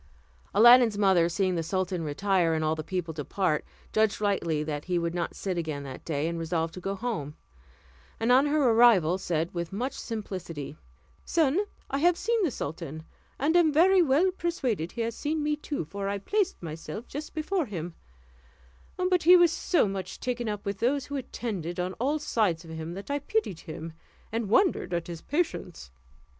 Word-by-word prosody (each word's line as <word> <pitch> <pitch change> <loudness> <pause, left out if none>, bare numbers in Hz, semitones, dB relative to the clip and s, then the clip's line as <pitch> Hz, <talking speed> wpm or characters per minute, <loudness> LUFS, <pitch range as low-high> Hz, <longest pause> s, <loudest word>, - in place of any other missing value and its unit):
Aladdin's 240 0 +7
mother, 190 -4 +4
seeing 185 +2 0
the 170 - 0
sultan 180 +1 -2
retire, 170 +2 +1
and 155 - -1
all 155 - +2
the 155 0 -4
people 175 -1 -3
depart, 155 +2 -1 0.3
judged 220 -1 +2
rightly 170 -7 0
that 150 -1 -4
he 180 -1 0
would 170 0 -1
not 175 -1 -3
sit 185 -3 -2
again 155 -4 -4
that 135 -2 -8
day, 155 -1 -1
and 170 0 -3
resolved 165 0 -1
to 185 - -7
go 195 +2 -2
home; 190 - -4 0.8
and 225 +2 +2
on 265 +3 +5
her 290 -4 +3
arrival 205 -7 +5
said, 165 -2 -1
with 170 -1 -4
much 245 +7 -2
simplicity, 185 - -6 0.5
"Son, 320 0 +2 0.3
I 275 - 0
have 345 +3 +4
seen 460 +4 0
the 345 - +2
sultan, 160 - -6 0.3
and 305 +5 +1
am 340 -3 +5
very 365 +5 +5
well 325 +5 +3
persuaded 255 - -2
he 235 - -3
has 230 0 -1
seen 300 +4 -2
me, 300 0 +1
too, 295 - -4
for 200 +5 -4
I 200 - -1
placed 390 - -1
myself 165 +7 -6
just 300 +3 -7
before 315 0 -1
him; 175 -4 -5 1.0
but 365 -1 +2
he 360 +3 +8
was 345 -2 +5
so 335 - +2
much 195 -2 -5
taken 245 -2 -2
up 210 -1 -4
with 200 -1 -3
those 270 +3 +1
who 285 - -6
attended 200 - -4
on 180 +1 -2
all 280 +5 +1
sides 210 - 0
of 165 - -10
him 160 +1 -6
that 200 +8 -7
I 285 - 0
pitied 290 - -1
him, 160 0 -8 0.4
and 225 -2 -2
wondered 345 - +2
at 170 - -2
his 170 -2 -7
patience. 290 - -3
200 Hz, 185 wpm, -28 LUFS, 165-280 Hz, 1.0 s, he